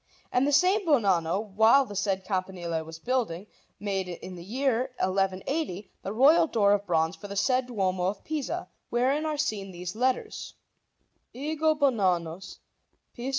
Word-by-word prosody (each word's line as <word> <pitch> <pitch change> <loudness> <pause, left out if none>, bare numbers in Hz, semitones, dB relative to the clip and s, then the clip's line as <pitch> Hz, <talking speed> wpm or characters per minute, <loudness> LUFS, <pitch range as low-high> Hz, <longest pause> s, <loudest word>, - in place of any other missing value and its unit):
And 255 +3 +2
the - - +2
same 370 +7 +4
Bonanno, 200 - +1
while 225 +6 +6
the 205 - -9
said 195 -1 -1
campanile 180 -4 -2
was 160 0 -9
building, 210 -3 -2 0.3
made, 195 -2 -2
in 180 +1 -7
the 175 -1 -9
year 255 +4 0
1180, 195 - -1
the 195 - -4
royal 300 +9 +5
door 205 -7 +3
of 205 0 -1
bronze 165 0 +1
for 205 - -10
the 200 - -7
said 255 +4 +2
Duomo 190 -6 -1
of 195 +1 -3
Pisa, 310 -3 -3 0.2
wherein 270 +6 +1
are 305 -1 -2
seen 215 -10 -2
these 180 +1 -6
letters: 255 +2 -1 0.8
EGO 310 +3 +1
BONANNUS 190 - 0 0.6
PIS. 245 +2 -5
205 Hz, 150 wpm, -27 LUFS, 185-265 Hz, 0.8 s, while